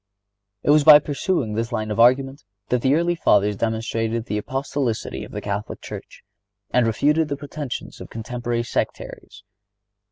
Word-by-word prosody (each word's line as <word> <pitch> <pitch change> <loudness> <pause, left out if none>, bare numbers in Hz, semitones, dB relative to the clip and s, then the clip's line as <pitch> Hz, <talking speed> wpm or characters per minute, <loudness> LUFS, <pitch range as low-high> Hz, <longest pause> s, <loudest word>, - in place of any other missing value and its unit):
It - - +3
was 150 0 +5
by 150 0 +10
pursuing 145 - -1
this 115 +3 -2
line 110 -2 -2
of 105 - -3
argument 135 +4 +3 0.3
that 125 -1 +1
the 135 +3 +3
early 170 +2 +2
Fathers 105 - +2
demonstrated 115 +1 -2
the 105 -2 -2
Apostolicity 135 -2 -3
of - - -10
the - - -5
Catholic 100 0 -4
Church, - - -10 0.5
and 125 -2 +3
refuted 150 +8 +2
the 140 -1 -3
pretensions 145 -2 -6
of - - -9
contemporary 120 +1 -3
sectaries. 105 -2 -5
120 Hz, 155 wpm, -22 LUFS, 110-145 Hz, 0.5 s, by